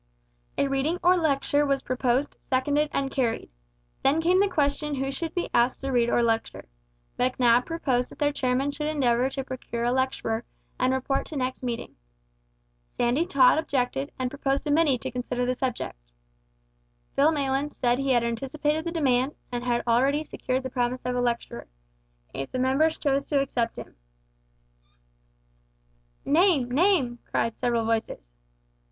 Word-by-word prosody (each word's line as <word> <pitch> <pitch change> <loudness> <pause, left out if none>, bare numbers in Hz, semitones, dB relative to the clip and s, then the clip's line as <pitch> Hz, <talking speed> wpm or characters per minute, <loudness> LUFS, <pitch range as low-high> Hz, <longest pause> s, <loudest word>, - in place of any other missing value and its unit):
A 280 - +2
reading 275 +5 0
or 355 +1 +6
a - - +1
lecture 290 -2 +2
was 275 -1 0
proposed, 255 +2 0
seconded, 290 +3 0
and 275 -1 -1
carried. 235 - -1 0.5
Then 280 +4 +3
came 355 +3 +3
the 400 0 +3
question 295 -2 0
who 270 0 -2
should 325 +5 -5
be 350 - -2
asked 240 +1 +2
to 270 0 -3
read 240 -2 +2
or 240 - +2
lecture. 225 -1 -1 0.5
Macnab 250 -1 +3
proposed 260 -7 0
that - - -13
their 290 -1 +1
chairman 260 +1 0
should 300 +1 -4
endeavour 260 -4 +2
to 270 0 -4
procure 255 -2 -5
a 240 - +2
lecturer, 260 -3 -1 0.4
and 255 +1 +2
report 265 +1 -1
to 310 - -8
next 255 -1 -2
meeting. 240 - -5 0.9
Sandy 250 - 0
Tod 275 -2 +5
objected, 250 - -1
and 255 -1 -2
proposed 275 -1 -1
a 295 - 0
committee 295 -3 +3
to - - -5
consider 245 0 -2
the 250 - +1
subject. 250 - -3 1.2
Phil 290 +3 +4
Maylands 280 -1 -1
said 245 0 +1
he 275 0 -1
had 240 -1 +3
anticipated 290 +7 -1
the 335 - -2
demand, 270 -4 +1 0.2
and 245 0 -3
had 240 -1 0
already 270 +6 +2
secured 260 -3 -3
the 260 - -5
promise 250 0 -1
of 250 0 -1
a 245 - +1
lecturer 240 -1 -2 0.7
if 135 0 -5
the - - -3
members 270 +5 +2
chose 280 -1 +1
to 285 - +1
accept 240 -4 -1
him. - - -9 2.3
"Name! 300 -5 +3
name!" 280 -6 +2
cried 230 - -1
several 235 -2 +1
voices. 220 - -2
265 Hz, 160 wpm, -26 LUFS, 245-290 Hz, 2.3 s, or